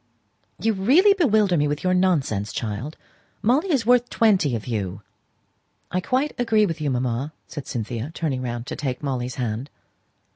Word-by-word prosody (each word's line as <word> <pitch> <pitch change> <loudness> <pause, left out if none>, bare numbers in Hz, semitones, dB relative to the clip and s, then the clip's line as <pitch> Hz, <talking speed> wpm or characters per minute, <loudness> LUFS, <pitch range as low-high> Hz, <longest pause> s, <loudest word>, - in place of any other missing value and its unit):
"You 225 +1 +1
really 280 - +5
bewilder 215 - +3
me 150 0 +2
with 145 0 -3
your 185 0 +2
nonsense, 145 - +1
child. 115 +7 -4 0.5
Molly 275 - +2
is 260 -7 +1
worth 245 0 +4
twenty 190 - +3
of 110 - -5
you." 100 -4 -3 0.9
"I 185 - 0
quite 265 +8 0
agree 220 -3 +3
with 165 -4 -4
you, 150 - 0
mamma," 125 +3 -1
said 145 - -7
Cynthia, 115 +2 -4
turning 150 -6 -2
round 120 -1 -4
to - - -5
take 130 -1 -4
Molly's 130 -2 -2
hand. 120 +2 -3
150 Hz, 160 wpm, -23 LUFS, -, 0.9 s, really